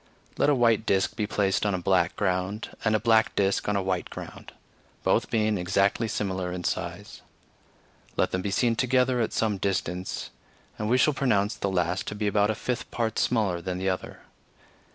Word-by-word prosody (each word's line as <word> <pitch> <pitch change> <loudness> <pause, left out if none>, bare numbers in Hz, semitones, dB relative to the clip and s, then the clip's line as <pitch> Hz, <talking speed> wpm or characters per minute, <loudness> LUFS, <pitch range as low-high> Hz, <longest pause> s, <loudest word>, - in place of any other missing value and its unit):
Let - - +2
a 145 - +4
white 115 -3 +3
disk 95 0 +1
be 105 -2 -1
placed 100 -2 +1
on 105 -2 +1
a - - -2
black 85 - +2
ground, 95 +4 -1
and 110 -1 +2
a - - +2
black 110 0 +3
disk 100 0 +1
on 105 - +1
a 100 - 0
white 95 -1 -2
ground, - - -9 0.5
both - - +2
being 110 -3 +1
exactly 100 +5 +1
similar 95 -4 -2
in 90 0 -5
size; - - -4 1.0
let - - +2
them 95 - -1
be 100 - -2
seen 115 +4 +2
together 125 0 +2
at 110 - 0
some 105 -3 0
distance, 90 -1 -2 0.5
and 105 0 -1
we 125 - +4
shall 140 +3 +4
pronounce 110 -7 +1
the 100 - -2
last 90 0 -1
to - - -4
be 105 0 -2
about 105 0 +2
a 110 - 0
fifth 125 +3 -3
part 115 -2 -1
smaller 100 -7 +1
than 90 +1 -3
the 95 +1 0
other. 95 - -4
105 Hz, 195 wpm, -27 LUFS, 95-115 Hz, 1.0 s, a